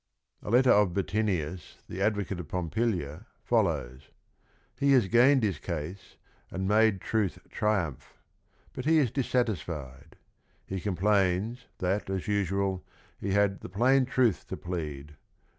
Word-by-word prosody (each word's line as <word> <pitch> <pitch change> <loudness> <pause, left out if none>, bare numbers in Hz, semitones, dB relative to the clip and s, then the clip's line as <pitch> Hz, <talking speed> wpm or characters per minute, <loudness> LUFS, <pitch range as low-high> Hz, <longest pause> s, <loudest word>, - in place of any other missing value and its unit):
A - - -7
letter 125 +2 +5
of 100 -4 +4
Bottinius, 95 -5 -2
the 95 - -6
advocate 100 -3 0
of 85 - -6
Pompilia, 90 -1 -2 0.2
follows: 75 - 0 0.3
— - - -37
He 140 0 +4
has 125 -7 +4
gained 125 +4 +5
his 95 -8 0
case, 85 +3 -6 0.3
and 95 +1 -3
"made 105 -2 +3
truth 105 -5 -1
triumph," 100 - -2 0.6
but 130 - -5
lie 160 - +4
is 145 -8 +3
dissatisfied. 80 - -2 0.5
He 95 -1 -4
com 100 -1 -2
plains, 100 +4 +1
that 95 +2 -1
as 95 -2 -3
usual, 100 -2 0 0.4
he 100 0 -2
had 100 -1 +2
"the - - -8
plain 125 +7 +3
truth 125 -6 +1
to - - -5
plead." 75 -5 -6
100 Hz, 140 wpm, -29 LUFS, 85-110 Hz, 0.6 s, letter